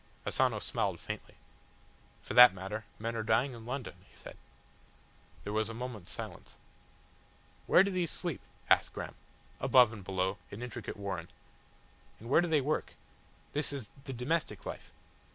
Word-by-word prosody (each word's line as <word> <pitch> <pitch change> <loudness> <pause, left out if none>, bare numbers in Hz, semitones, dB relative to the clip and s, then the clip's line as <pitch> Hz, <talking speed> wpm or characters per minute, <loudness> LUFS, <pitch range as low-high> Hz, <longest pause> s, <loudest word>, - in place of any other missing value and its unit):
Asano - - +2
smiled - - -1
faintly. - - -7 0.9
"For - - -5
that 125 -5 +10
matter, 100 +4 -5
men 115 +1 -3
are 115 - -1
dying 115 +5 +2
in 115 -1 -10
London," 130 0 -4 0.2
he - - -22
said. - - -10 1.1
There 105 - -4
was 110 0 +1
a 115 - -6
moment's 115 -6 -6
silence. - - -7 1.1
"Where 180 - +7
do 200 - -1
these 180 -3 0
sleep?" 170 -5 -3 0.3
asked - - +4
Graham. - - -5 0.5
"Above 125 -3 +6
and 105 -3 -9
below 95 +1 -1
an 110 +4 -7
intricate 125 -2 -6
warren." 95 -4 -4 0.9
"And 115 +3 -8
where 160 - +6
do 175 - 0
they 155 -3 +3
work? 150 +3 -1 0.6
This 150 0 +2
is 135 -7 -5 0.2
the 135 - -4
domestic 125 - -1
life." - - -7
115 Hz, 155 wpm, -32 LUFS, 105-140 Hz, 1.1 s, that